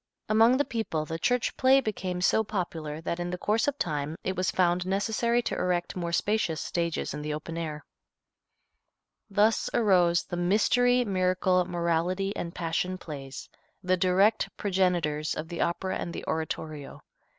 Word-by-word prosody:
Among 225 +4 +5
the 285 - +1
people 215 -10 -2
the 165 +1 -5
church 245 +6 +1
play 265 +1 +5
became 190 -7 -3
so 220 +4 +3
popular 165 -7 -4
that 170 +1 -3
in 175 0 -2
the 180 - -3
course 215 +7 +1
of 285 0 0
time 150 - -2
it 190 - -2
was 185 0 0
found 180 -1 +2
necessary 225 +5 +1
to - - -2
erect 175 -1 -1
more 170 -2 -3
spacious 175 -3 0
stages 170 0 -2
in 150 - -5
the 150 0 -3
open 160 +2 -7
air. 155 -3 -5 1.4
Thus 210 +2 +2
arose 180 -6 +4
the 175 - -5
Mystery, 245 +7 +3
Miracle, 185 -2 +2
Morality 175 +3 -1
and 170 -1 -5
Passion 180 +2 -1
Plays, 140 -6 -8 0.4
the 185 0 +2
direct 190 +4 +3
progenitors 175 -6 0
of 160 - -5
the 170 - -4
Opera 185 +2 -1
and 170 - -5
the - - -6
Oratorio. 155 -2 -4
180 Hz, 160 wpm, -28 LUFS, 165-205 Hz, 1.4 s, Among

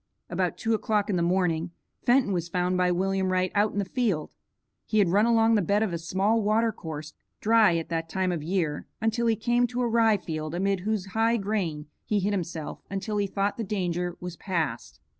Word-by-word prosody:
About - - -1
two 225 -1 0
o'clock 210 -1 0
in - - +1
the 175 - +1
morning, 175 -1 +1 0.3
Fenton 245 -4 +3
was 170 -1 -2
found 180 +1 0
by 180 0 +2
William 190 +1 0
Wright 185 0 +1
out 205 +1 +2
in - - -6
the 200 - +1
field. 195 - -1 0.5
He 215 - 0
had 200 -4 +4
run 205 +5 +4
along 225 -1 +4
the 215 - +4
bed 200 +4 +2
of 200 -5 -2
a 170 - -2
small 195 +6 +1
water 220 +2 +2
course, 155 -5 -7 0.3
dry 220 -5 +4
at 165 - -4
that 165 -1 -2
time 185 0 0
of 170 -3 -2
year, 160 -2 -2
until 225 +1 0
he 225 - +3
came 240 +2 +2
to 250 +1 -3
a 245 - +2
rye 225 -2 +4
field 155 -3 -5
amid 195 +1 +1
whose 210 0 -1
high 225 +1 +3
grain 195 -8 -2 0.2
he 210 - 0
hid 200 +2 0
himself 170 -5 -4
until 200 +2 -3
he 200 -1 +1
thought 200 +1 -1
the 230 - -2
danger 180 -4 -2
was 180 -1 -6
past. 160 - -3
195 Hz, 215 wpm, -27 LUFS, 175-220 Hz, 0.5 s, had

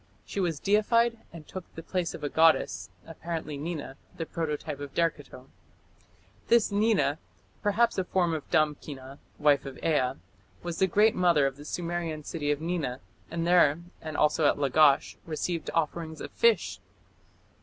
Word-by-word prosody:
She - - -5
was 170 -6 0
deified 230 +3 +2
and 160 -3 -11
took 185 -2 -9
the 165 - -7
place 180 -1 -2
of - - -10
a - - 0
goddess, 160 - +3 0.2
apparently 165 -2 -5
Nina, 145 -2 -5 0.2
the 165 - -3
prototype 150 -3 -4
of 145 -1 -8
Derceto. 145 -6 -2 1.0
This 235 -3 +4
Nina, 200 -9 +2 0.4
perhaps 215 +1 +2
a - - +1
form 175 -2 +1
of 155 -2 -5
Damkina, 145 -3 -1 0.2
wife 145 -2 +3
of 135 -2 -8
Ea, 130 -5 +2 0.5
was 175 -1 -4
the 190 - +4
great 210 +4 +4
mother 170 -6 +3
of 135 -1 -1
the 145 +1 -12
Sumerian 170 -2 -3
city 145 -1 -3
of 145 -1 +1
Nina, 160 -7 -2 0.3
and 165 0 -2
there, 170 -3 +4 0.2
and 155 -2 -5
also 150 0 +3
at - - +2
Lagash, 140 0 +3
received 165 +1 -3
offerings 160 0 -2
of - - -7
fish. 465 0 +2
160 Hz, 155 wpm, -28 LUFS, 145-175 Hz, 1.0 s, This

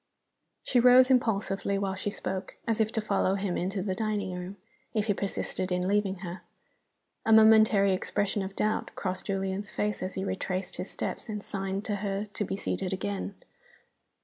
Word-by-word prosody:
She 250 - +3
rose 250 +2 +7
impulsively 200 -5 +1
while 195 -1 -1
she 190 +2 -3
spoke, 190 -2 -4
as 225 -1 +2
if 220 0 +1
to 220 - +1
follow 200 -2 +1
him 195 -2 -1
into 190 +1 -1
the 190 -2 -1
dining 210 -3 -2
room, 180 +2 -6 0.4
if 210 -1 +2
he 210 - +2
persisted 190 -1 -3
in 180 0 0
leaving 200 -1 +1
her. 175 +2 -6 0.8
A 225 - +1
momentary 220 -3 +7
expression 205 +2 -1
of 190 +1 -5
doubt 215 0 0
crossed 185 -1 -3
Julian's 195 +1 -2
face 210 0 -2
as 185 +1 -4
he 190 - -2
retraced 185 -1 -3
his - - -4
steps - - -4
and 210 -1 -4
signed 195 +1 -3
to 205 -2 -1
her 200 0 -2
to 210 0 -4
be 195 - -3
seated 195 -1 -2
a - - -1
gain. 100 - -3
195 Hz, 180 wpm, -29 LUFS, 190-210 Hz, 0.8 s, rose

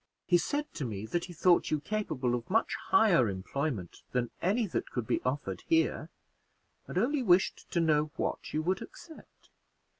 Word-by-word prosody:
He 175 0 +4
said 290 - -1
to 150 - -4
me 110 -4 -4
that 170 +9 -2
he 180 - -10
thought 175 +2 +3
you 155 - +1
capable 145 - -2
of 120 -1 -3
much 225 +4 +2
higher 175 - +5
employment 100 - -4
than 125 -2 0
any 210 +6 +2
that 190 - -3
could 125 -3 -3
be - - 0
offered 135 +3 -2
here, 330 -1 +1 0.8
and - - -5
only 265 +8 +2
wished 190 -5 +2
to 170 - 0
know 155 -2 +3
what - - -3
you 155 - -1
would 185 +3 0
accept. 325 -2 -13
170 Hz, 175 wpm, -30 LUFS, 125-205 Hz, 0.8 s, higher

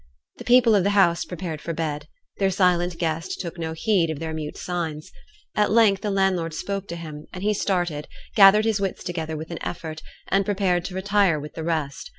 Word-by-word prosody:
The - - -8
people 245 -2 +6
of 200 -3 +4
the 200 - +2
house 170 -3 +4
prepared 165 -3 -5
for 170 - -4
bed. 150 -2 -3 0.3
Their 195 -1 +3
silent 180 -2 +2
guest 165 -1 -2
took 170 -1 -6
no 160 -1 -3
heed 170 0 +1
of 160 - -3
their 160 +1 -4
mute 155 -1 -5
signs. 165 -4 -4 0.4
At 210 0 +2
length 210 -3 +4
the 210 - -2
landlord 190 -5 +1
spoke 200 +3 -4
to 170 - -5
him, 155 -3 -8
and 185 - -7
he 210 +1 +2
started, 175 -7 -1 0.3
gathered 210 +1 +7
his 220 -3 +1
wits 195 -1 -2
together 160 -3 -4
with 160 +2 -7
an 170 - -6
effort, 160 -2 -5 0.3
and 195 +1 +3
prepared 190 -3 0
to 185 - -6
retire 195 -4 +2
with 150 +1 -8
the 160 - -6
rest. 155 -4 -2
175 Hz, 205 wpm, -24 LUFS, 160-195 Hz, 0.4 s, gathered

